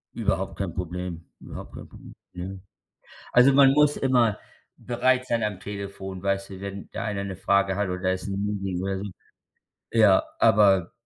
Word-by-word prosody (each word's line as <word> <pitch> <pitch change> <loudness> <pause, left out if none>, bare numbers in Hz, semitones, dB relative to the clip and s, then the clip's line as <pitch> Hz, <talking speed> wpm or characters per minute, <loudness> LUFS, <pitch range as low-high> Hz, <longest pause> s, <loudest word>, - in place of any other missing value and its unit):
Überhaupt 95 +2 -1
kein 95 -4 -3
Problem. 90 -1 -5
Überhaupt - - -10
kein - - -9
Pro - - -14 0.4
ne? 95 +1 -7 0.7
Also, 130 +2 +6
man 135 -1 +7
muss 150 +1 +4
immer 120 -5 +2 0.4
bereit 130 +1 +1
sein 115 -3 0
am 105 -3 -2
Telefon, 100 -2 -7
weißt 100 0 -1
du, 95 -1 -9
wenn 100 0 -7
da - - -4
einer 100 -2 -2
'ne 95 -1 -5
Frage 100 0 +2
hat 100 -1 -1
oder 90 0 -1
ist 95 - -6
'n 100 +1 -2
Meeting 95 -3 -3
oder 95 0 -2
so. 100 - -5 0.9
Ja, 105 -4 +5 0.2
aber 95 -4 +4
100 Hz, 170 wpm, -25 LUFS, 95-105 Hz, 0.9 s, man